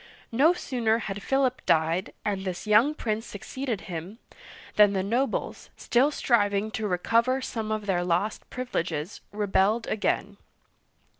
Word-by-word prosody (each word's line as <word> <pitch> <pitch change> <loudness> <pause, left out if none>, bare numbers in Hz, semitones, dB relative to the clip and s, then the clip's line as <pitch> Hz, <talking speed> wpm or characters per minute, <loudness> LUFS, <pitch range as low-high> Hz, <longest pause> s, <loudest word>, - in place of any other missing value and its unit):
No 275 +8 +5
sooner 235 -9 0
had 205 -3 -5
Philip 265 +2 +1
died, 165 +3 +2
and 195 -2 -1
this 185 0 -4
young 220 +8 +4
prince 220 -5 -2
succeeded 235 +1 -5
him, 180 +4 -7 0.6
than 205 -1 +6
the 190 -1 0
nobles 240 +7 -1
— - - -39
still 255 +4 +3
striving 210 -6 +1
to 220 -2 -2
recover 230 +8 +2
some 225 -4 -4
of 215 -1 -2
their 180 -3 +1
lost 180 +5 -1
privi 255 0 -6
leges 165 +1 -2
— - - -42
rebelled 205 +2 +1
again. 205 -1 -1
210 Hz, 150 wpm, -27 LUFS, 195-240 Hz, 0.6 s, than